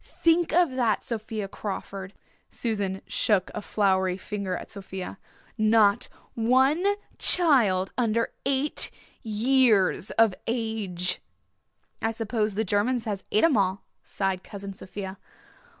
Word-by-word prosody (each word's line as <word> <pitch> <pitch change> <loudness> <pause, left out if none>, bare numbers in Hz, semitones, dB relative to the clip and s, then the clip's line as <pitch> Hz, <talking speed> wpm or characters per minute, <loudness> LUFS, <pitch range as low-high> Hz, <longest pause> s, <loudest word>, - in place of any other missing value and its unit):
Think 335 +1 +2
of 345 -3 +4
that, 240 -5 +1
Sophia 220 -2 -4
Crawford" 195 -1 -6 0.4
Susan 200 -5 -2
shook 200 -4 +1
a 210 - -4
floury 190 -3 +1
finger 195 -2 -3
at - - -9
Sophia 190 -1 -7 0.4
"not 215 -2 +4 0.2
one 260 +8 +3 0.4
child 230 - +3
under 230 -1 +1
eight 275 +2 +1 0.3
years 220 -3 +3
of 225 -3 +5
age!" 220 -7 -2 0.8
"I 225 - +1
suppose 220 -2 -1
the 220 +2 0
Germans 220 +5 +1
has 205 -3 -3
et 215 - +3
'em 330 -5 +5
all," 195 -1 +1 0.2
sighed 190 -2 -2
Cousin 200 -1 -7
Sophia. 190 0 -7
215 Hz, 120 wpm, -26 LUFS, 195-235 Hz, 0.8 s, of